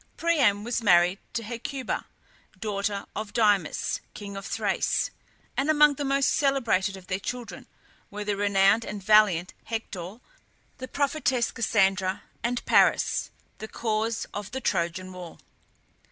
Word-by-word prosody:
Priam 270 -12 +2
was 235 +1 -1
married 180 -2 +4
to 235 - -2
Hecuba, 245 +4 -4 0.5
daughter 200 -2 -2
of 215 0 -5
Dymas, 205 -7 +1
king 200 -1 -7
of 195 0 -6
Thrace; - - 0 0.4
and 275 +3 0
among 300 -1 +6
the 285 - -4
most 275 0 +2
celebrated 230 -9 +1
of 185 - -13
their 185 0 -2
children 245 +3 -6 0.4
were 210 +1 -5
the 205 0 -1
renowned 200 +2 +3
and 205 -3 -6
valiant 205 -5 +4
Hector, 205 -4 -5 0.6
the 260 - -6
prophetess 275 -4 0
Cassandra, 195 -3 +1 0.2
and 240 +1 -2
Paris, - - +3 0.3
the 220 - -6
cause 225 0 -1
of 205 -1 -5
the 265 - -4
Trojan 185 -3 -2
war. 180 -2 -9
210 Hz, 135 wpm, -26 LUFS, 195-240 Hz, 0.6 s, among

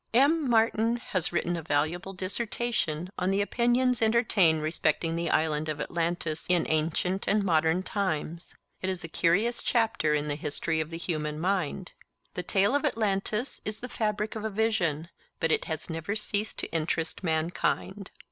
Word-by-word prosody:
M. 285 +2 +4
Martin 225 0 +3
has 190 -7 -2
written 175 0 0
a 165 - -3
valuable 160 +5 -1
dissertation 190 -3 -2
on 180 - +1
the 195 +1 +2
opinions 240 +3 +2
entertained 215 -8 +3
respecting 160 +1 +1
the 170 0 -1
Island 155 -1 +1
of 150 -1 -3
Atlantis 165 -1 -2
in 175 -2 +3
ancient 165 +4 0
and 210 0 +3
modern 165 0 +2
times. 170 -4 -3 0.3
It 190 - -1
is 185 -2 -1
a - - -4
curious 195 +9 +2
chapter 225 -10 +2
in 150 0 -1
the 145 - 0
history 150 +2 -1
of 155 - -4
the 165 - -5
human 155 -3 -3
mind. 185 0 -1 0.4
The - - -2
tale 195 +5 +2
of 285 - +2
Atlantis 220 -2 -1
is 215 0 -3
the 250 - -6
fabric 210 -1 -1
of 215 - -4
a 220 - -1
vision, 195 -7 0 0.3
but 165 - +1
it - - +1
has 160 -1 -4
never 165 +4 -3
ceased 210 0 -1
to - - -4
interest 165 +2 -1
mankind. 175 +4 -1
180 Hz, 165 wpm, -28 LUFS, 160-215 Hz, 0.4 s, M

